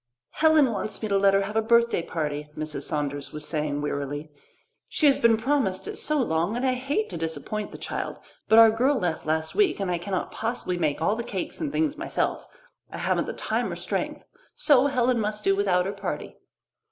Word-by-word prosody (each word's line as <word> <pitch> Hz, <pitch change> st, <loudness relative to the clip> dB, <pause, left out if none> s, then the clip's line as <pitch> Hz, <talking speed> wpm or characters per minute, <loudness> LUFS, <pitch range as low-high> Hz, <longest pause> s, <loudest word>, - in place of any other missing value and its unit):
"Helen 315 Hz, -5 st, +4 dB
wants 215 Hz, +1 st, -4 dB
me 215 Hz, -, -1 dB
to 200 Hz, -, +3 dB
let 195 Hz, 0 st, +4 dB
her 195 Hz, -, +3 dB
have 210 Hz, +2 st, -6 dB
a 225 Hz, -, +3 dB
birthday 235 Hz, -3 st, +3 dB
party," 150 Hz, -3 st, -4 dB
Mrs. 155 Hz, 0 st, -3 dB
Saunders 145 Hz, -1 st, -3 dB
was 150 Hz, 0 st, -4 dB
saying 150 Hz, -2 st, -1 dB
wearily. 145 Hz, +1 st, -4 dB, 0.6 s
"She 310 Hz, -, 0 dB
has 280 Hz, -2 st, +5 dB
been 230 Hz, -1 st, +5 dB
promised 225 Hz, -6 st, 0 dB
it -, -, -5 dB
so 305 Hz, +1 st, 0 dB
long 175 Hz, -1 st, 0 dB
and 250 Hz, -, -1 dB
I 260 Hz, -, +3 dB
hate 280 Hz, +12 st, -1 dB
to -, -, -4 dB
disappoint 165 Hz, +6 st, -4 dB
the -, -, -10 dB
child, -, -, -4 dB, 0.3 s
but 220 Hz, -, +5 dB
our 225 Hz, -1 st, +9 dB
girl 260 Hz, +5 st, +2 dB
left 170 Hz, -6 st, -2 dB
last 160 Hz, 0 st, 0 dB
week, 410 Hz, -, +2 dB
and 195 Hz, -2 st, -1 dB
I 175 Hz, -, -1 dB
cannot 185 Hz, +1 st, -3 dB
possibly 220 Hz, -6 st, -3 dB
make 155 Hz, -1 st, 0 dB
all 205 Hz, +5 st, +2 dB
the 235 Hz, -, -3 dB
cakes 190 Hz, -5 st, -4 dB
and 300 Hz, -3 st, -2 dB
things 305 Hz, 0 st, 0 dB
myself. 335 Hz, -, -2 dB, 0.4 s
I -, -, -7 dB
haven't -, -, 0 dB
the -, -, -3 dB
time -, -, -2 dB
or -, -, -4 dB
strength, -, -, -3 dB, 0.3 s
so 280 Hz, -3 st, +4 dB
Helen 250 Hz, -3 st, +1 dB
must 210 Hz, 0 st, -2 dB
do 195 Hz, -, +3 dB
without 185 Hz, -3 st, +2 dB
her 195 Hz, -, -2 dB
party." 200 Hz, -, -5 dB
205 Hz, 210 wpm, -26 LUFS, 160-250 Hz, 0.6 s, our